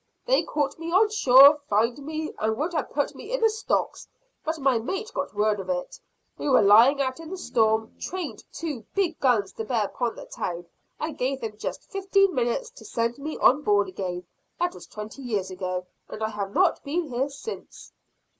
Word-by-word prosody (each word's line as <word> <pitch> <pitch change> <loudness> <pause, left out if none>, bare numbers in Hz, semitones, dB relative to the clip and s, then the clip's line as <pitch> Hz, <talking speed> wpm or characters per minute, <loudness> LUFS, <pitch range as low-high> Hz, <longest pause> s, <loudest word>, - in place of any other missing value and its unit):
"They - - +4
caught 290 0 -2
me 330 0 -5
on 415 +4 +4
shore, 280 - +8
fined 230 +5 +2
me, 310 +2 -4
and 220 +1 0
would 320 +6 -2
have 310 -4 -1
put 285 0 -1
me 435 - -10
in - - 0
the 450 -2 +4
stocks; 440 - -2 0.4
but 320 +1 -2
my 270 -5 +2
mate 385 - -4
got 280 -5 -3
word 210 0 +2
of 190 -1 -6
it, 180 -1 -3 0.4
we - - -1
were 260 - +5
lying 230 +8 +7
out 260 +1 -1
in 325 -1 -9
the 380 - -5
storm, 220 -8 +1
trained 335 - -5
two 290 -7 -5
big 365 -5 0
guns 225 -7 +2
to 225 - -5
bear 220 -2 0
upon 235 +3 -3
the - - -9
town, 175 0 -5 0.3
and 310 0 -4
gave 265 +2 0
them 220 -2 -4
just 210 - -5
fifteen 390 -1 +2
minutes 255 - -1
to - - -14
send 235 +3 -2
me 305 +2 -5
on 275 +4 +5
board 205 -6 +3
again. 180 -1 -5 0.3
That 355 0 0
was - - -12
twenty 215 +5 -8
years 210 -7 -2
ago, 185 -1 -3 0.2
and 220 - -6
I 220 - 0
have 200 -2 -4
not 365 - +2
been 320 +5 -1
here 265 -2 -2
since." 285 +11 -9
265 Hz, 200 wpm, -26 LUFS, 215-325 Hz, 0.4 s, shore